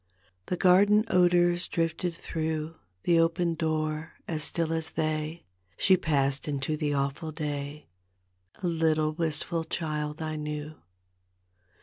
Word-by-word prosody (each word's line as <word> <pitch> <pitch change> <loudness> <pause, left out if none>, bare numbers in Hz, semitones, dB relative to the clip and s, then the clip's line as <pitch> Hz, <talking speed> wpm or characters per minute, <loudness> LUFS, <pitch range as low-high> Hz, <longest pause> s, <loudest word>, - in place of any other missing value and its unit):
The 180 - -1
garden 200 +4 +5
odors 175 -1 +3
drifted 165 +1 -1
through 160 -1 -3 0.3
The 170 -1 +4
open 165 +1 +2
door; 155 -1 -2
as 160 -2 -2
still 165 0 +1
as 160 -1 -1
they 155 +1 -2 0.3
She 190 - +5
passed 140 -6 +1
into 145 +1 -1
the 150 -1 -1
awful 140 +3 -2
day, 145 -1 -4 0.8
A - - +1
little, 160 -2 +2
wistful 165 +1 -1
child 150 -2 -3
I 155 -1 -3
knew. 150 0 -4
160 Hz, 120 wpm, -28 LUFS, 150-170 Hz, 0.8 s, garden